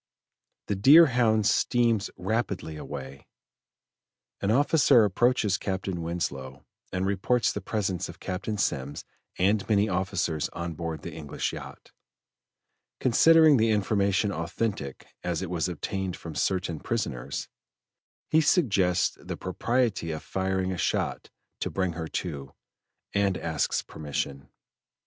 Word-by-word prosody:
The 100 - -1
Deerhound 120 - +6
steams 115 -2 +2
rapidly 100 -5 -2
away. 70 -2 -8 1.1
An 100 - 0
officer 135 -1 +5
approaches 105 0 +2
Captain 95 -2 -3
Winslow 70 -6 -4 0.3
and 95 0 -1
reports 100 +5 +1
the 105 - -4
presence 95 -3 -2
of - - -11
Captain 100 +3 -3
Semmes 70 -6 -2 0.3
and 100 +4 +1
many 105 -1 +3
officers 90 -5 -1
on 85 -1 -4
board 80 -2 -5
the - - -6
English 75 -3 -4
yacht, - - -10 1.1
considering 155 +4 +6
the 115 0 +3
information 100 -1 +1
authentic 85 -4 -3 0.2
as 90 0 -2
it 90 - -5
was 90 0 0
obtained 95 +2 -3
from 85 - -8
certain 90 -2 -1
prisoners; 90 - -3 0.8
he 160 - +4
suggests 100 - +2
the - - -6
propriety 115 0 -1
of 80 -1 -4
firing 95 0 -1
a 90 - -4
shot - - -1 0.3
to - - -2
bring 95 -3 -1
her 80 -1 -5
to, 70 -6 -5 0.6
and 100 -2 +2
asks 80 -3 -1
permission. 70 -2 -5
95 Hz, 120 wpm, -27 LUFS, 85-110 Hz, 1.1 s, Deerhound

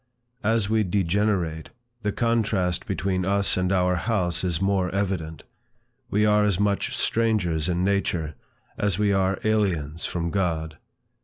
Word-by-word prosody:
As 110 -1 +2
we 110 0 +2
degenerate, 90 -3 0 0.3
the 105 -1 0
contrast 110 -6 0
between 95 -1 -1
us 100 +1 +1
and 90 0 0
our 90 -1 +2
house 90 -6 -1
is 90 -3 0
more 95 -1 +1
evident. 90 -5 -2 0.7
We 105 +1 +2
are 105 0 +4
as 100 -3 +1
much 100 -1 0
strangers 95 -8 +1
in 90 0 0
nature, 90 -5 0 0.5
as 100 -4 +1
we 105 -1 +2
are 95 0 +1
aliens 90 -8 0
from 85 -1 -2
God. 80 -5 -1
95 Hz, 140 wpm, -25 LUFS, 85-105 Hz, 0.7 s, are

